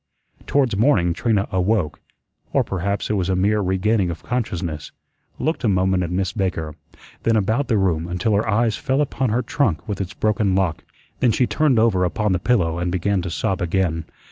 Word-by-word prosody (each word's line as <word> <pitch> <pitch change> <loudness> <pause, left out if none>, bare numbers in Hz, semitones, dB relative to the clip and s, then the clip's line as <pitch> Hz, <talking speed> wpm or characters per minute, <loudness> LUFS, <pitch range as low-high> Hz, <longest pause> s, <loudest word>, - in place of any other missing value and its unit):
Towards 135 -7 +2
morning 100 -7 +3
Trina 105 +1 0
awoke 95 -3 0 0.5
or - - +3
perhaps 100 +3 -2
it - - +2
was 95 -3 0
a 95 - +2
mere 105 +3 +2
regaining 95 +1 +1
of 85 -2 -6
consciousness 90 -10 -3 0.5
looked 160 +2 -2
a - - +2
moment 95 -1 +2
at 90 - -2
Miss 95 +1 -1
Baker, 85 -6 -2 0.5
then 115 - +2
about 110 +6 +1
the 110 - +2
room 85 -4 +1
until 90 +5 0
her 105 +2 +1
eyes 110 0 +2
fell 135 +6 0
upon 135 -3 -1
her 120 +4 0
trunk 130 - 0
with 100 -2 -3
its 95 +2 -5
broken 105 -3 +1
lock. 95 -5 0 0.4
Then 125 - +3
she 125 - +2
turned 145 -1 +2
over 110 -5 +3
upon 105 +3 0
the 90 - +1
pillow 85 -8 +1
and 90 0 -1
began 95 +2 0
to 90 - -4
sob 95 +3 -1
again. 85 -2 0
95 Hz, 195 wpm, -21 LUFS, 90-110 Hz, 0.5 s, morning